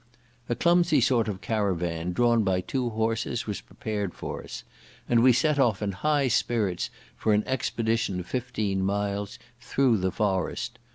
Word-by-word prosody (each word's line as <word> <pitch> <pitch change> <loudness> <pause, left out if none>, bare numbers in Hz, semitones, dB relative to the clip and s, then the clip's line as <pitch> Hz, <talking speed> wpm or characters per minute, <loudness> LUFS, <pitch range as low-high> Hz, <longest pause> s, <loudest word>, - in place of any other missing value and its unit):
A 120 - +1
clumsy 170 -1 +4
sort 120 -2 +2
of 100 -3 -4
caravan 90 -6 -1
drawn 120 +3 +3
by 95 -2 +1
two 125 +6 -2
horses 115 +1 -1
was 105 -2 -4
prepared 105 -4 -4
for - - -6
us; - - -8 0.4
and 120 -1 +4
we 130 +1 +7
set 145 +4 +2
off 115 -7 +3
in 105 -2 -1
high 145 +6 +1
spirits 110 -6 0 0.3
for 110 - +1
an 105 - +2
expedition 115 -6 -1
of 90 - -6
fifteen 105 -4 -2
miles 100 +1 -2 0.2
through 125 -1 +2
the 95 0 0
forest. 95 -4 -1
110 Hz, 160 wpm, -27 LUFS, 100-120 Hz, 0.4 s, we